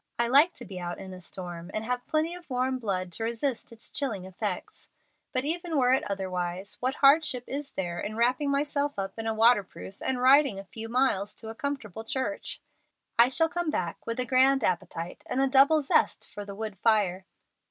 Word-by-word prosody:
I 235 Hz, -, +2 dB
like 290 Hz, +8 st, +5 dB
to -, -, -7 dB
be 190 Hz, -2 st, -7 dB
out 175 Hz, 0 st, -4 dB
in 190 Hz, -1 st, -8 dB
a 180 Hz, -, -10 dB
storm, 175 Hz, -1 st, -7 dB
and 215 Hz, -, -1 dB
have 245 Hz, +1 st, -2 dB
plenty 315 Hz, +2 st, +1 dB
of 350 Hz, -2 st, -8 dB
warm 255 Hz, 0 st, 0 dB
blood 185 Hz, -5 st, -2 dB
to 200 Hz, -, -3 dB
resist 235 Hz, +2 st, -2 dB
its 230 Hz, -1 st, -5 dB
chilling 225 Hz, -10 st, -2 dB
effects. 190 Hz, 0 st, -5 dB, 0.4 s
But 255 Hz, -1 st, +1 dB
even 335 Hz, +1 st, 0 dB
were 255 Hz, -1 st, +4 dB
it 265 Hz, -, +3 dB
otherwise, 185 Hz, -1 st, -3 dB
what 260 Hz, +2 st, -1 dB
hardship 275 Hz, -3 st, +4 dB
is 285 Hz, +1 st, -5 dB
there 175 Hz, -2 st, -3 dB
in 210 Hz, -, -4 dB
my -, -, -7 dB
wrapping 255 Hz, +5 st, +2 dB
myself 285 Hz, 0 st, 0 dB
up 195 Hz, +2 st, -4 dB
in 225 Hz, -, -3 dB
a 225 Hz, -, +1 dB
waterproof 215 Hz, -4 st, +2 dB
and 260 Hz, -1 st, 0 dB
riding 265 Hz, -3 st, +5 dB
a 195 Hz, -, -6 dB
few 220 Hz, +4 st, -7 dB
miles 230 Hz, -5 st, +1 dB
to 220 Hz, -, -7 dB
a -, -, -5 dB
comfortable 225 Hz, -6 st, -4 dB
church? 225 Hz, -3 st, -3 dB, 0.6 s
I 235 Hz, -, +8 dB
shall 325 Hz, +6 st, +3 dB
come 345 Hz, 0 st, -2 dB
back -, -, -3 dB
with 230 Hz, +1 st, -3 dB
a 250 Hz, -, +1 dB
grand 265 Hz, +2 st, +4 dB
appetite 170 Hz, -1 st, -2 dB
and 255 Hz, -, -1 dB
a 270 Hz, -, +4 dB
double 280 Hz, +3 st, +5 dB
zest 275 Hz, -, +2 dB
for 205 Hz, -, -6 dB
the 200 Hz, -1 st, -8 dB
wood 210 Hz, -3 st, -6 dB
fire." 195 Hz, -4 st, +2 dB
235 Hz, 205 wpm, -28 LUFS, 195-275 Hz, 0.6 s, I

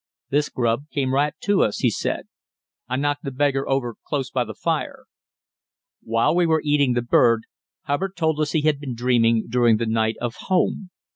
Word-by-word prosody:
"This 145 Hz, 0 st, +1 dB
grub 120 Hz, +4 st, -1 dB
came 130 Hz, -2 st, -1 dB
right 145 Hz, +2 st, +1 dB
to 205 Hz, -1 st, +2 dB
us," 105 Hz, -, +1 dB
he -, -, +2 dB
said; -, -, -3 dB, 0.6 s
"I 125 Hz, -, -1 dB
knocked 145 Hz, +1 st, -1 dB
the 140 Hz, -, -3 dB
beggar 135 Hz, 0 st, 0 dB
over 135 Hz, -3 st, 0 dB
close 135 Hz, -3 st, -3 dB
by 125 Hz, -, +1 dB
the 110 Hz, -3 st, -8 dB
fire." 260 Hz, -, -3 dB, 1.0 s
While -, -, +1 dB
we 175 Hz, -1 st, +3 dB
were 160 Hz, -1 st, +2 dB
eating 145 Hz, -3 st, +3 dB
the 120 Hz, -1 st, 0 dB
bird, 115 Hz, -1 st, +3 dB, 0.4 s
Hubbard 185 Hz, +7 st, -2 dB
told 160 Hz, -2 st, 0 dB
us 150 Hz, -1 st, 0 dB
he 160 Hz, -, +2 dB
had 150 Hz, -2 st, +1 dB
been 135 Hz, -4 st, -5 dB
dreaming 115 Hz, -2 st, +2 dB
during 120 Hz, -2 st, +3 dB
the 115 Hz, -, -2 dB
night 110 Hz, 0 st, 0 dB
of 120 Hz, -1 st, -3 dB, 0.2 s
home. 185 Hz, 0 st, +1 dB
135 Hz, 190 wpm, -23 LUFS, 120-150 Hz, 1.0 s, we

